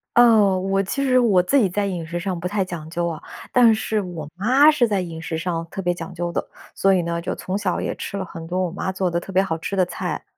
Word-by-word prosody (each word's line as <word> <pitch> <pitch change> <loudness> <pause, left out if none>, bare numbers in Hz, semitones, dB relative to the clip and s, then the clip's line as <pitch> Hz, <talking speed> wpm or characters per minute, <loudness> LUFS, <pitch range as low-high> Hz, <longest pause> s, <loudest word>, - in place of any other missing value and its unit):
哦， 220 -6 +6
我 195 +1 +1
其 275 +8 -2
实 255 -2 +4
我 205 -7 +4
自 275 +10 +2
己 210 -7 +3
在 205 +3 -1
饮 180 -4 -3
食 170 +1 -4
上 185 0 -3
不 180 - -3
太 195 0 0
讲 165 -3 -7
究 170 +1 -1
啊， 165 -2 -5 0.3
但 235 -3 +6
是 220 0 -1
我 175 -5 -6
妈 255 +10 +5
是 265 -6 +2
在 200 -3 0
饮 165 -2 -6
食 160 0 -3
上 165 0 -2
特 195 - -5
别 175 -1 +1
讲 180 +1 -8
究 175 0 -3
的。 - - -2 0.3
所 195 0 +3
以 185 - +3
呢， 170 0 -2
就 170 - -3
从 185 +2 -3
小 205 -3 -1
也 - - -3
吃 200 - -5
了 190 - -3
很 165 -1 -9
多 180 +2 -1
我 175 - -4
妈 190 +1 -3
做 190 -1 -1
的 170 0 0
特 185 - -9
别 190 0 +4
好 160 -4 -2
吃 165 +4 -4
的 185 -2 +3
菜。 - - -4
185 Hz, 295 characters per minute, -22 LUFS, 170-205 Hz, 0.3 s, 哦